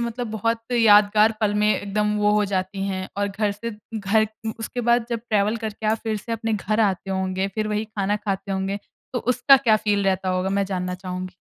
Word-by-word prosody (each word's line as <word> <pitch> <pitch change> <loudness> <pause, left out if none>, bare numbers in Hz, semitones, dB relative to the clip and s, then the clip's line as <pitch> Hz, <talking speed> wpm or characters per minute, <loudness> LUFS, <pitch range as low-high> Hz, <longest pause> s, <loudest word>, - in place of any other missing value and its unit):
मतलब 235 -1 -3
बहुत 230 +1 -1
यादगार 215 -1 +5
पल 205 -1 +1
में 210 - +4
एकदम 210 +1 -1
वो 210 0 +3
हो 210 0 +3
जाती 190 +1 -2
हैं 190 -1 -3
और 200 0 0
घर 205 +1 -1
से 230 +3 -6 0.3
घर 215 +2 +2 0.3
उसके 230 +2 -4
बाद 235 -1 +3
जब 230 - -1
ट्रैवल 210 +1 +2
करके 215 0 -4
आप 220 +1 +2
फिर 220 -1 -1
से 220 +3 -6
अपने 225 0 -2
घर 215 +1 0
आते 195 -2 0
होंगे, 190 0 -1
फिर 215 -1 -1
वही 210 +1 -1
खाना 205 -2 -1
खाते 200 -1 -3
होंगे 195 +1 -2 0.3
तो 245 - 0
उसका 250 +3 +5
क्या 235 -5 +3
फ़ील 205 -2 0
रहता 190 -1 0
होगा 185 +1 0
मैं 200 0 +1
जानना 180 -1 -3
चाहूँगी? 185 0 -6
210 Hz, 210 wpm, -23 LUFS, 195-220 Hz, 0.3 s, यादगार